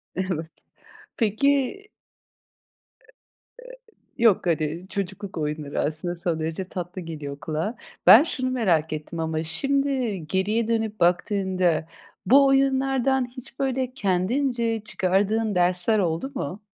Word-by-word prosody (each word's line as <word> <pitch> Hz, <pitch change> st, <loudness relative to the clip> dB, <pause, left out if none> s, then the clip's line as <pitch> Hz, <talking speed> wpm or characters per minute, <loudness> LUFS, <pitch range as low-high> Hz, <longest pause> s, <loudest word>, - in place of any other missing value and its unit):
Evet, 175 Hz, -4 st, -3 dB, 0.7 s
peki 265 Hz, -, +1 dB, 1.3 s
E -, -, -26 dB, 1.1 s
e -, -, -2 dB
yok 210 Hz, -5 st, +4 dB
hadi 160 Hz, +1 st, -1 dB
çocukluk 195 Hz, -1 st, -5 dB
oyunları 150 Hz, -1 st, -3 dB
aslında 160 Hz, +4 st, -2 dB
son 170 Hz, -2 st, -2 dB
derece 160 Hz, +4 st, -3 dB
tatlı 180 Hz, 0 st, -6 dB
geliyor 150 Hz, -4 st, -7 dB
kulağa. 160 Hz, +10 st, -3 dB, 0.3 s
Ben 235 Hz, -, +10 dB
şunu 255 Hz, -5 st, -2 dB
merak 170 Hz, -11 st, +1 dB
ettim 155 Hz, +2 st, -6 dB
ama 160 Hz, 0 st, -1 dB
şimdi 260 Hz, -, 0 dB
geriye 210 Hz, +6 st, 0 dB
dönüp 220 Hz, -2 st, -1 dB
baktığında 180 Hz, -2 st, +1 dB, 0.4 s
bu 275 Hz, +7 st, +6 dB
oyunlardan 270 Hz, -1 st, +2 dB
hiç 255 Hz, +1 st, -12 dB
böyle 260 Hz, -1 st, -1 dB
kendince 230 Hz, +3 st, 0 dB
çıkardığın 205 Hz, +2 st, 0 dB
dersler 180 Hz, +4 st, +2 dB
oldu 175 Hz, +9 st, -1 dB
mu? 210 Hz, -5 st, -5 dB
195 Hz, 115 wpm, -24 LUFS, 170-245 Hz, 1.3 s, Ben